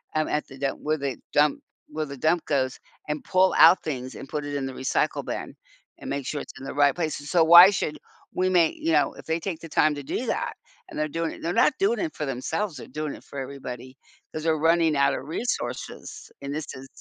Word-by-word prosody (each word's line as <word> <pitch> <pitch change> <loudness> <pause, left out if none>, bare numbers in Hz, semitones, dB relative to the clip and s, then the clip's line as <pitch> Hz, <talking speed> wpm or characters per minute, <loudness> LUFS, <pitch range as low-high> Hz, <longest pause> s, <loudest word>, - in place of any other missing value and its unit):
um, 155 0 +1
at 150 - -1
the 135 - -12
dump 135 0 -2
where 155 +1 0
the 140 -4 -3 0.2
dump 145 0 +3 0.3
where 155 0 -3
the 140 0 -8
dump 160 +5 +1
goes, 130 -3 0 0.3
and 150 0 -3
pull 185 0 +3
out 165 +4 +8
things, 130 -4 -4
and 135 - -9
put 150 +1 -3
it 145 0 -4
in 140 -1 -2
the 135 - -5
recycle 130 - -1
bin, - - -5 0.4
and - - -7
make 140 -1 -3
sure 145 +1 -3
it's - - -11
in 135 - -9
the - - -5
right 145 -1 +3
place. 155 -4 -2
S 145 - -9
so 175 -3 +4
why 170 +3 +10
should 170 -6 -2 0.3
we 185 0 +1
make, 170 -3 +3
you 165 - -1
know, 150 -2 +3
if - - -13
they 160 +1 -1
take 170 -2 -4
the 165 - -9
time 155 0 +3
to 145 - -6
do 240 - -3
that, - - -2 0.4
and - - -9
they're 155 - +1
doing 165 +2 -2
it - - -8
and - - -14
they're 170 - 0
not 300 - +4
doing 210 +3 +2
it 160 - -3
for 150 - -3
themselves, 145 +8 -3
they're - - -9
doing 155 -1 -4
it - - -14
for - - -11
everybody 130 -1 -7 0.4
'cause 155 - -4
they're 160 -1 +2
running 165 0 +3
out 140 - +3
of - - -5
resources 235 +10 -4
and 140 0 -5
this 155 -1 -3
is 130 +1 -10
155 Hz, 250 wpm, -25 LUFS, 140-165 Hz, 0.4 s, why